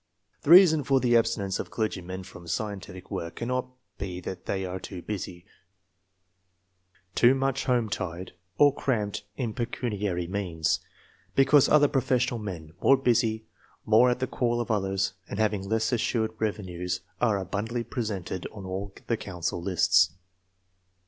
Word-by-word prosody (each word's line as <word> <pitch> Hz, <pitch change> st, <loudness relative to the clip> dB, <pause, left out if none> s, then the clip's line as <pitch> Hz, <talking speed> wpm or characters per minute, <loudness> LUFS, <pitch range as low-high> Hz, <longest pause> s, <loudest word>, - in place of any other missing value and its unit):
The -, -, -5 dB
reason 170 Hz, -4 st, +8 dB
for 135 Hz, 0 st, +3 dB
the 120 Hz, -1 st, +3 dB
abstinence 100 Hz, -4 st, +1 dB
of -, -, -4 dB
clergymen 95 Hz, -4 st, -3 dB
from 90 Hz, -2 st, -12 dB
scientific 95 Hz, -1 st, -5 dB
work 85 Hz, +1 st, -4 dB
cannot 125 Hz, +2 st, -2 dB, 0.3 s
be 90 Hz, -2 st, -4 dB
that 90 Hz, 0 st, -7 dB
they 95 Hz, -1 st, -1 dB
are 95 Hz, 0 st, -4 dB
too 90 Hz, -3 st, -8 dB
busy, 90 Hz, -4 st, -5 dB, 1.7 s
too 125 Hz, +6 st, +5 dB
much 135 Hz, 0 st, 0 dB
home 120 Hz, -3 st, +2 dB
tied, 90 Hz, -2 st, -4 dB, 0.3 s
or 145 Hz, -2 st, +6 dB
cramped 105 Hz, -8 st, -2 dB
in 120 Hz, -5 st, -2 dB
pecuniary 105 Hz, -7 st, -2 dB
means, 85 Hz, -4 st, -1 dB, 0.6 s
because 135 Hz, +1 st, +5 dB
other 145 Hz, -1 st, +6 dB
professional 125 Hz, -3 st, +1 dB
men, 85 Hz, -7 st, -7 dB
more 135 Hz, -, +6 dB
busy, 115 Hz, -4 st, +1 dB, 0.4 s
more 110 Hz, +3 st, +6 dB
at 125 Hz, -, +1 dB
the 130 Hz, -, -1 dB
call 120 Hz, -2 st, 0 dB
of 120 Hz, -1 st, -2 dB
others, 95 Hz, -2 st, 0 dB, 0.2 s
and 100 Hz, -, -5 dB
having 105 Hz, -3 st, 0 dB
less 110 Hz, +2 st, +1 dB
assured 115 Hz, -2 st, 0 dB
revenues, 90 Hz, -4 st, -2 dB, 0.2 s
axQ 110 Hz, -5 st, +3 dB
abundantly 110 Hz, +6 st, -3 dB
represented 105 Hz, -7 st, -4 dB
on 100 Hz, -3 st, -9 dB
all 95 Hz, +2 st, -4 dB
the 115 Hz, -, 0 dB
couxicil 90 Hz, -3 st, -4 dB
lists. 90 Hz, -1 st, +3 dB
105 Hz, 145 wpm, -27 LUFS, 95-120 Hz, 1.7 s, reason